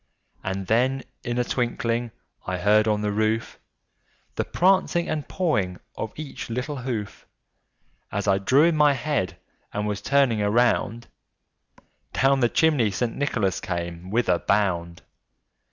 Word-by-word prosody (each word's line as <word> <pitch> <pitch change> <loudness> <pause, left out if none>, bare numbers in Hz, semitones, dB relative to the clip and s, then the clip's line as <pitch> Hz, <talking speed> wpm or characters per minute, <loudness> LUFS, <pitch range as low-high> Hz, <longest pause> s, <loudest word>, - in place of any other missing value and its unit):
And 95 0 -3
then, 130 +5 +1 0.2
in 120 0 -2
a 125 - +2
twinkling, 120 -1 -1 0.4
I 90 0 -1
heard 105 +4 +3
on 105 -1 +1
the 105 -1 0
roof 110 +2 -1 0.7
The - - -1
prancing 185 -2 +2
and 155 -2 -3
pawing 105 - 0 0.2
of 110 - -4
each 150 -5 -7
little 130 +5 -3
hoof. 120 -5 -5 0.8
As 100 +1 -2
I 95 -1 +3
drew 130 +9 +4
in 170 -1 +4
my 150 -1 +5
head, 135 - -2 0.3
and 105 0 -2
was 105 -1 -2
turning 135 -6 +2
around, 115 +1 +1 1.1
Down 135 +1 +3
the 120 -2 +3
chimney 145 -9 +3
St. 115 +4 -2
Nicholas 115 -9 0
came 85 0 -5
with 115 +4 +1
a 90 -1 +3
bound. 85 -4 0
115 Hz, 140 wpm, -25 LUFS, 100-135 Hz, 1.1 s, my